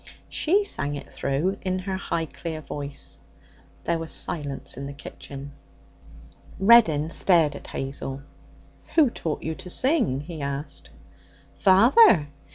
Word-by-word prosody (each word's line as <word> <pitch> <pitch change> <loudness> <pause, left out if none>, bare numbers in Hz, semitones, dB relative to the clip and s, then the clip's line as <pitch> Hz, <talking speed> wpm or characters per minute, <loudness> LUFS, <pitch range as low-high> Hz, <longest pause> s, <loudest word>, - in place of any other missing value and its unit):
She 390 +6 +2
sang 145 - -2
it 140 -1 -9
through 155 +9 -1
in 185 -1 -1
her 190 +1 -3
high 170 -3 -2
clear 160 0 -6
voice. 140 - -7 0.6
There 170 -1 0
was 165 -1 -5
silence 145 -4 -4
in 140 +2 -6
the 140 - -7
kitchen. 140 0 -9 1.1
Reddin 175 -8 +5
stared 165 -7 +3
at - - -10
Hazel. 135 0 -5 0.7
'Who 300 -7 +5
taught 160 -8 -4
you 160 - -2
to 180 - -10
sing?' 245 - +1
he 160 0 -8
asked. 140 +1 -5 0.6
'Father. 195 - +6
160 Hz, 130 wpm, -25 LUFS, 140-190 Hz, 1.1 s, Father